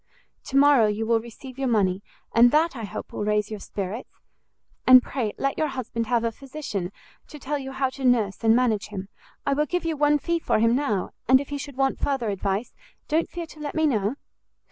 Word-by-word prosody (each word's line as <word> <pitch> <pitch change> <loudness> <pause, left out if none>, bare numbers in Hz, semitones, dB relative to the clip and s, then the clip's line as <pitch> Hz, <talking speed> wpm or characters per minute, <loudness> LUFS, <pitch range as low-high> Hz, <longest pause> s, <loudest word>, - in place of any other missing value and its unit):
To 275 - -1
morrow 280 -5 +6
you 210 +1 -1
will 230 0 +3
receive 245 +3 -11
your 270 - 0
money, 200 -5 +1 0.3
and 235 +1 +7
that, 310 +3 +2
I 230 -3 -5
hope, 195 - -7
will - - -3
raise 210 0 0
your 215 - -5
spirits. 200 +4 -5 0.8
And 255 -1 +9
pray 230 -6 -3
let 275 0 -1
your 310 - +2
husband 240 -4 -4
have 235 -1 +1
a 230 - 0
physician, 255 -8 -5 0.4
to 300 - -10
tell 290 +1 -3
you 270 -1 -6
how 265 -1 -1
to 270 - -9
nurse 230 -5 +2
and 225 0 +5
manage 225 -4 +1
him; 195 -2 -7 0.4
I 280 - +2
will 300 +2 +1
give 355 +1 -2
you 325 -1 0
one 295 0 +3
fee 335 +3 -1
for - - +1
him 230 +2 +3
now, 220 -9 -1 0.2
and 260 +2 +6
if 280 - -6
he 285 0 -4
should 275 -1 -8
want 270 0 +1
further 265 -6 -1
advice, 200 +3 -2 0.3
don't 320 +2 +1
fear 345 -1 -5
to 310 -1 -15
let 295 -1 -5
me 315 0 +2
know." 220 -4 +1
255 Hz, 220 wpm, -25 LUFS, 215-285 Hz, 0.8 s, And